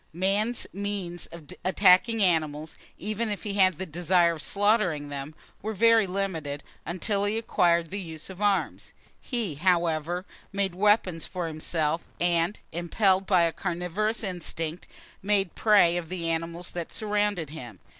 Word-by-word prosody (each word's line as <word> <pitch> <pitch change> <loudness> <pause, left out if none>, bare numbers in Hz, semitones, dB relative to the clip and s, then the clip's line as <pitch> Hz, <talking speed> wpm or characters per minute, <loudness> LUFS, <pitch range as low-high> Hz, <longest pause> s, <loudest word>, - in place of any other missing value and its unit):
Man's 200 +7 +1
means 195 -3 -3
of 170 -2 -12 0.2
attacking 195 +4 +4
animals, 155 -3 0 0.2
even 215 +4 -2
if 205 - -4
he 205 - -3
had 185 -4 +3
the 190 - -4
desire 175 +1 +2
of 160 - -6
slaughtering 200 -8 +1
them, 140 +2 -6 0.3
were 220 +2 -3
very 230 0 +5
limited, 165 -7 -3 0.2
until 200 +4 -1
he 210 +2 0
acquired 170 -6 +2
the 200 +1 -3
use 160 -3 -6
of 190 +1 -9
arms. 205 -2 0 0.3
He, 230 - -2
however, 170 +1 0 0.3
made 195 -2 -1
weapons 190 -4 +2
for 180 -2 -4
himself, 160 0 -1 0.2
and, 175 +2 +1
impelled 185 +3 +1
by 180 -4 +4
a 165 - +2
carnivorous 190 +5 -2
instinct, 175 -3 -3 0.3
made 195 -2 +1
prey 200 -6 +4
of 165 -2 -5
the 175 -2 -3
animals 165 +2 -3
that 170 -2 -5
surrounded 205 -7 -1
him. 120 - -9
180 Hz, 145 wpm, -27 LUFS, 165-205 Hz, 0.3 s, very